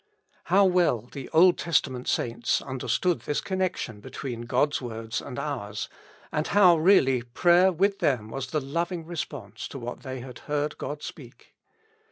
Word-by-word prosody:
How 195 +3 +5
well 180 - +3
the 140 -3 -7
Old 175 +2 +5
Testament 135 -6 0
saints 120 0 0
understood 135 +5 -1
this 145 +5 -2
connection 185 - -2
between 120 0 -6
God's 140 +5 +1
words 115 -1 -4
and 125 - -8
ours, 105 -8 -4 0.4
and 155 0 -1
how 190 -4 +6
really 155 -7 +4
prayer 175 +10 +4
with 195 +3 +1
them 110 -6 +1
was 135 -1 -4
the 155 +4 -1
loving 170 +5 -3
response 110 - -6
to - - -8
what 120 -1 -6
they 130 -2 -6
had 125 -1 -9
heard 150 0 -1
God 145 0 -5
speak - - -11
140 Hz, 155 wpm, -27 LUFS, 120-175 Hz, 0.4 s, how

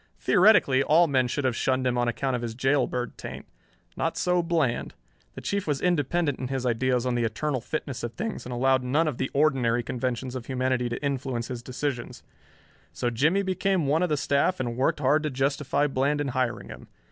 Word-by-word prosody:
Theoretically 185 -9 +4
all 160 +5 +5
men 130 -5 +2
should 140 +3 -2
have 125 -3 +1
shunned 130 +1 0
him 125 -1 +1
on 120 0 +1
account 130 +2 -1
of 120 - -3
his 115 -2 -4
jailbird 130 -1 0
taint. - - -7 0.5
Not - - -2
so 180 0 +2
Bland. 165 -8 -1 0.4
The - - -7
Chief 200 -3 -2
was 145 -3 0
independent 165 -3 0
in 130 - -3
his 130 -1 -3
ideas 125 +1 +1
on 125 - 0
the 120 -1 0
eternal 130 +4 -1
fitness 140 -1 -4
of 120 0 -4
things 220 +3 -4
and 125 - -8
allowed 130 +1 +2
none 145 +6 +1
of 150 - -3
the 130 - -1
ordinary 130 -5 +2
conventions 125 +1 -3
of 125 -2 -6
humanity 130 -1 0
to 120 - -5
influence 130 -4 -2
his 125 -2 -5
decisions. 125 0 -4 0.7
So 120 - -2
Jimmie 160 - +2
became 190 -2 0
one 150 +4 +2
of 180 - +1
the 150 - +1
staff 140 +6 +1
and 120 -2 -2
worked 135 +3 0
hard 145 +3 +3
to 155 - -1
justify 140 +1 0
Bland 140 +1 0
in 145 -2 -1
hiring 130 -2 -2
him. - - -10
135 Hz, 205 wpm, -26 LUFS, 125-150 Hz, 0.7 s, all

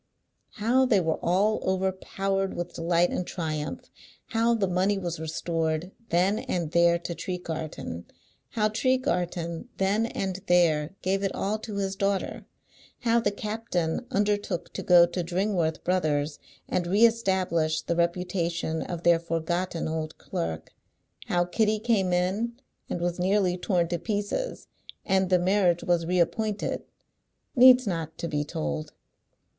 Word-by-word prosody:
How 250 +4 +2
they 215 -6 +4
were 160 -3 0
all 200 +5 +2
overpowered 190 +1 -1
with 175 - -4
delight 170 +1 +2
and - - -1
triumph; 155 -3 -3 0.5
how 230 +1 +2
the 205 -4 +1
money 185 +3 +1
was 175 -4 -4
restored, 160 +1 -2 0.2
then 185 +5 +2
and 170 -4 -2
there, 170 0 +4
to 170 0 -5
Tregarthen; 160 - -5 0.5
how 215 -2 +2
Tregarthen, 180 -7 -1
then 205 +4 +1
and 190 -4 -3
there, 170 -2 +3
gave 195 +1 +1
it 195 - -1
all 210 +2 -1
to 215 -1 -7
his 195 -1 -1
daughter; 195 -1 -1 0.5
how 235 -1 +3
the 225 - +1
captain 210 -2 -2
undertook 205 -3 -1
to - - -4
go 175 -1 +7
to 175 +1 -3
Dringworth 175 -2 -1
Brothers 155 -5 0 0.3
and 175 -1 -1
re 205 +6 +5
establish 185 -8 +1
the 170 - -1
reputation 170 -1 -1
of 170 -1 -5
their 170 -1 +5
forgotten 170 +1 -2
old 160 0 -4
clerk; 80 -1 -4 0.6
how 175 0 +2
Kitty 215 +4 +1
came 210 -4 +1
in, 190 +7 0 0.4
and - - -2
was 175 0 -1
nearly 185 0 +2
torn 180 -2 0
to 175 -1 -1
pieces, 210 - -3 0.4
and 190 -1 +2
the 185 - +5
marriage 180 -1 +2
was 170 -2 +1
reappointed, 195 +4 0 0.7
needs 255 0 +8
not 165 -5 -3
to 170 - -3
be 150 -2 -1
told. 155 0 -4
180 Hz, 140 wpm, -27 LUFS, 170-205 Hz, 0.7 s, needs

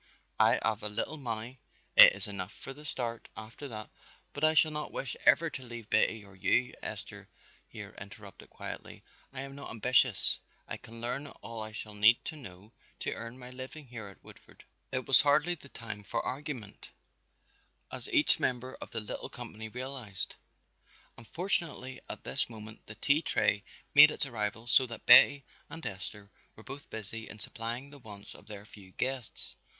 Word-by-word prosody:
I - - +5
haf 110 -2 +1
a 105 - -1
little 115 +9 -2
money, 120 0 -5 0.4
it - - +11
is - - -4
enough 100 -1 -1
for 135 - -8
the 150 +2 -13
start, 120 -5 -3
after 110 +6 -8
that 110 -4 -7 0.2
" - - -30
"But 145 - -6
I 155 0 +5
shall 155 0 +6
not 150 0 -3
wish 135 - -3
ever 165 -1 +6
to 130 - -4
leave 120 -3 -9
Betty 110 -2 +2
or 100 -1 -16
you," 125 +6 +2
Esther - - -7 0.4
here - - -9
interrupted - - -11
quietly. - - -8 0.3
"I 135 -1 -5
am 135 0 -7
not 140 0 -8
ambitious; 120 -1 +3 0.3
I - - -4
can 115 0 -11
learn 125 +4 -2
all 115 -4 -8
I 110 0 -5
shall 110 0 -6
need 105 +3 +6
to - - -4
know 100 -6 -11 0.3
to - - -1
earn 115 +2 -7
my 125 -1 -10
living 130 +4 -8
here 115 -5 -8
in 95 - -15
Woodford." - - -16 0.3
It 130 0 -2
was 135 - +7
hardly 145 +4 +3
the 145 -4 -12
time 105 -4 -7
for - - -2
argument, 130 -6 -4 1.0
as - - -1
each - - +4
member 130 +1 0
of - - -6
the 115 - -2
little 105 - -6
company 110 -2 -7
realized, 125 -5 -4 0.8
and 115 - -14
fortunately 165 - 0
at - - -7
this 140 - -1
moment 110 -1 -10
the 110 - -9
tea 140 +7 +3
tray 105 -9 +2 0.3
made 150 +1 +10
its 150 - -1
arrival 115 -2 -3
so 125 +2 +5
that 115 - -9
Betty 145 -1 +9 0.2
and 165 - -8
Esther 100 +2 -6 0.2
were 110 - -13
both 135 +3 -8
busy 110 +1 -3
in 105 - -9
supplying 115 +5 -5
the 145 - -12
wants 105 -4 -10
of 105 - -15
their 105 -1 -9
few 95 -3 -15
guests. 130 -3 -1
120 Hz, 185 wpm, -31 LUFS, 110-135 Hz, 1.0 s, it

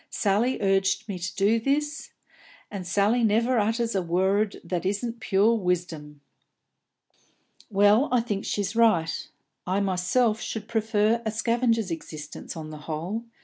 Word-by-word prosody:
Sally 215 +5 +1
urges 195 +2 +1
me 195 -4 -5
to 175 +2 -5
do 225 +7 +2
ut, 300 +1 -5 0.6
and 190 -4 -6
Sally 205 +6 +2
never 230 +3 +2
utters 225 +2 0
a 195 - +1
worrud 190 +4 0
that 175 0 -3
isn't 230 +5 -2
pure 215 +1 +3
wisdom." 175 -7 -3 1.5
"Well, 205 +6 +4
I 250 -2 +3
think 205 -4 -3
she's 205 +1 -2
right. 215 -9 +2 0.4
I 185 +2 +1
myself 200 +4 +1
should 220 -1 -5
prefer 220 0 +1
a 220 - -1
scavenger's 230 -2 0
existence, 155 0 -7
on 155 -1 -7
the 155 - -8
whole. 180 +9 -3
205 Hz, 140 wpm, -26 LUFS, 185-230 Hz, 1.5 s, Well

